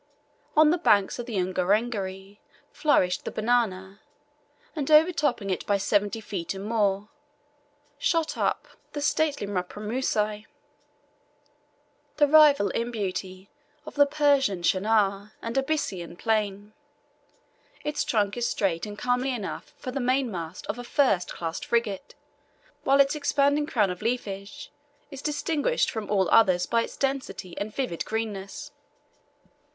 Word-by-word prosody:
On 310 0 +7
the 350 - +1
banks 205 - +3
of 240 - -5
the 230 - -5
Ungerengeri 195 +1 -1 0.3
flourished 185 -12 +2
the - - -4
banana, 215 -4 0 0.8
and 295 -3 -3
overtopping 305 - +3
it 185 - -2
by 205 - +3
seventy 205 +2 0
feet 195 -4 -5
and 190 +1 -6
more, 210 -2 0 0.9
shot 325 +1 +1
up - - -1 0.3
the 295 - -3
stately 295 -4 +1
mparamusi, 210 +2 -2 1.7
the 295 - +5
rival 290 -7 +6
in 235 +1 -2
beauty 190 -3 -4 0.4
of - - -8
the 285 -1 +5
Persian 280 - +2
chenar 200 +1 +1
and 230 0 -5
Abyssinian 270 - -2
plane. 210 0 -1 1.1
Its 300 0 -1
trunk 205 -3 0
is 240 -1 -1
straight 180 -3 -1
and 205 0 -8
comely 250 +2 0
enough 225 -6 -5
for 255 - -6
the 275 - -3
mainmast 240 -10 -2
of 235 - -4
a - - -5
first, 240 - +1
class 165 -1 -4
frigate, 235 +2 -2 0.7
while 275 +1 +3
its 275 0 +5
expanding 290 0 +1
crown 210 -10 +1
of 180 - -7
leafage 225 +2 -4 0.4
is 275 -1 -8
distinguished 305 +9 0
from 220 -3 -5
all 195 -3 +2
others 185 -5 +5
by 230 - +1
its - - -6
density 265 -10 -3
and 210 +1 -5
vivid 250 -12 -2
greenness. 220 +6 -5
220 Hz, 130 wpm, -26 LUFS, 195-275 Hz, 1.7 s, On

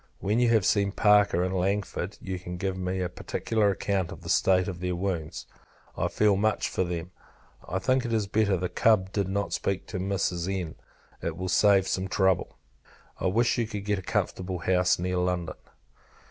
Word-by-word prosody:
When 105 +4 0
you 120 -1 +3
have 110 -5 +3
seen 100 +2 +2
Parker 105 -5 +4
and 95 +1 -1
Langford, 95 0 -2
you 95 -1 -5
can 90 0 -7
give 95 0 -2
me 95 0 -2
a 90 - 0
particular 105 +4 -1
account 95 -2 -1
of - - -10
the - - -7
state 95 -1 +3
of 90 -2 -5
their 90 0 -2
wounds. 85 -3 -3 0.5
I - - 0
feel 105 -2 +3
much 110 +2 +1
for - - 0
them. 85 0 -4 0.6
I 90 - -1
think 130 +6 +1
it 120 - -3
is 110 -2 +1
better 100 -1 +1
the 90 +1 -1
Cub 95 +1 +2
did 100 -2 -1
not 100 +1 -2
speak 100 -1 -1
to 95 - -4
Mrs. 95 -2 -1
N. 85 -3 -5 0.5
It - - -3
will 95 0 -3
save 100 -1 +4
some 95 +1 -1
trouble. 95 -2 +1 0.6
I - - 0
wish 120 +6 +2
you 115 - 0
could 105 -2 -6
get 105 -1 0
a - - -7
comfortable 90 +1 -2
house 90 +1 +2
near 90 +1 -2
London. 90 -2 -1
95 Hz, 195 wpm, -27 LUFS, 90-105 Hz, 0.6 s, Parker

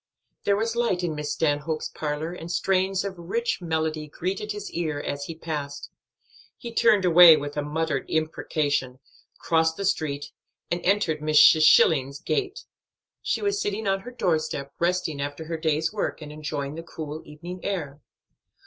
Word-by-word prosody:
There 200 - +3
was 225 +2 -1
light 230 -7 0
in 170 -3 -1
Miss 150 -1 -4
Stanhope's 150 +1 -1
parlor 155 +2 -4
and 170 -1 -7
strains 190 +1 +1
of 190 -3 -5
rich 230 +6 -2
melody 160 -2 -2
greeted 190 +7 -3
his 205 0 -6
ear 155 -4 -2
as 140 -1 -4
he 165 - -7
passed. 150 -3 -5 0.7
He 235 -2 -8
turned 215 -5 +4
away 170 -2 +9
with 145 0 -5
a 150 - 0
muttered 150 -1 -2
imprecation, 145 -4 -1 0.4
crossed 160 0 +1
the 200 - -3
street, 145 -6 -1 0.4
and 175 0 0
entered 185 -6 +2
Mrs. 155 +1 +6
Schilling's 140 -3 +4
gate. 395 +3 -2 0.6
She - - -1
was 405 0 0
sitting 395 - -2
on 195 0 +2
her 235 - -9
doorstep, 155 - -1
resting 170 -4 0
after 145 +3 -5
her 165 +1 -3
day's 160 +2 0
work, 210 - -2
and 150 -2 -9
enjoying 145 -2 -4
the 165 - -6
cool 155 -2 -7
evening 170 +5 -9
air. 150 -8 -4
160 Hz, 160 wpm, -25 LUFS, 150-190 Hz, 0.7 s, away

